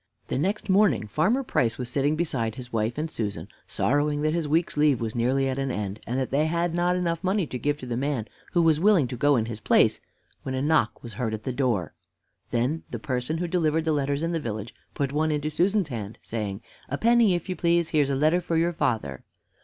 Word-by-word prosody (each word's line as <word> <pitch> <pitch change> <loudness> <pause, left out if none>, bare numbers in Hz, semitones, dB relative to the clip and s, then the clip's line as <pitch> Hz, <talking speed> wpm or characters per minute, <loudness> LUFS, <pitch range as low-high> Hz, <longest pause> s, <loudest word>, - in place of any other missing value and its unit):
The - - -1
next 195 +8 -1
morning 195 - +3
Farmer 165 - +1
Price 115 - 0
was 125 - -4
sitting 140 +4 +1
beside 130 -9 -1
his 125 -2 -9
wife 115 +2 0
and 155 +2 -1
Susan 100 -6 -4 0.2
sorrowing 145 +2 +1
that 155 0 +1
his 165 -3 -1
week's 165 +3 +1
leave 150 -3 +3
was 115 -1 -3
nearly 130 +3 +1
at 135 0 -2
an 135 0 -1
end, 105 -3 -3
and 125 +3 -1
that 130 - -2
they 150 +3 +2
had 170 +1 0
not 175 +1 +1
enough 170 -1 -1
money 190 0 +1
to 125 -4 -6
give 145 +2 0
to - - -6
the 120 -1 -3
man 135 -3 -1 0.3
who 175 -2 +4
was 160 -2 +4
willing 185 -7 +4
to 125 - -4
go 145 +4 +3
in 115 -3 +1
his 115 -2 -6
place, - - +3 0.4
when 130 - -4
a 130 - -1
knock 150 -7 +1
was 120 -2 -7
heard 110 +1 -2
at 110 - -10
the 130 - -3
door. 120 - 0 0.6
Then 125 +7 0
the - - -4
person 130 +2 -2
who 175 +1 -2
delivered 160 -2 +1
the 160 - +2
letters 145 0 0
in 165 - 0
the 165 - 0
village 110 -4 -5 0.2
put 140 -1 -1
one 155 +1 +1
into 150 0 -1
Susan's 190 +1 +1
hand, 110 -4 -5
saying, 105 -2 -4 0.3
"A 140 - -2
penny, 230 -3 +4
if 175 - -4
you 185 - -2
please 170 -1 +2
here's 150 -4 +2
a 140 - +1
letter 155 +6 +3
for 170 -2 -1
your 170 +1 +2
father." 110 - -1
145 Hz, 235 wpm, -26 LUFS, 120-165 Hz, 0.6 s, who